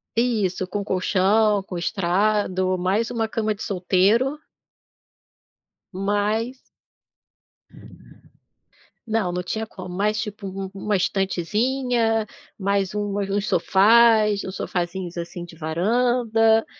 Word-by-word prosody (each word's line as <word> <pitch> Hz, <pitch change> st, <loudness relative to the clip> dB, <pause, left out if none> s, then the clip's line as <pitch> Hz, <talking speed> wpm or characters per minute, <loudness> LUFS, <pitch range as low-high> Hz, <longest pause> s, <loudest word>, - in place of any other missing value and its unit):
Isso, 210 Hz, -6 st, 0 dB
com 205 Hz, +2 st, -3 dB
colchão, 200 Hz, +2 st, +2 dB
com 185 Hz, -2 st, -7 dB
estrado. 185 Hz, +1 st, 0 dB
Mais 195 Hz, +6 st, 0 dB
1 225 Hz, -2 st, -1 dB
cama 220 Hz, -1 st, -1 dB
de 205 Hz, -, -7 dB
solteiro. 200 Hz, +9 st, +2 dB, 1.6 s
Mais 205 Hz, +6 st, -1 dB, 2.5 s
Não, 220 Hz, -5 st, 0 dB
não 180 Hz, 0 st, -2 dB
tinha 220 Hz, +4 st, -3 dB
como. 185 Hz, -3 st, -9 dB
Mais 210 Hz, +3 st, 0 dB
tipo, 210 Hz, -2 st, -6 dB
u 190 Hz, 0 st, -6 dB
1 205 Hz, +1 st, -2 dB
estantezinha, 225 Hz, +5 st, 0 dB, 0.3 s
mais 200 Hz, 0 st, -1 dB
um 210 Hz, -, 0 dB, 0.2 s
u -, -, 0 dB, 0.2 s
uns 205 Hz, 0 st, -1 dB
sofás, 210 Hz, +3 st, +4 dB
uns 190 Hz, -, -6 dB
sofazinhos, 175 Hz, 0 st, -4 dB
assim, 170 Hz, +1 st, -6 dB
de 175 Hz, -1 st, -12 dB
varanda, 225 Hz, +6 st, +2 dB
205 Hz, 105 wpm, -23 LUFS, 185-225 Hz, 2.5 s, sofás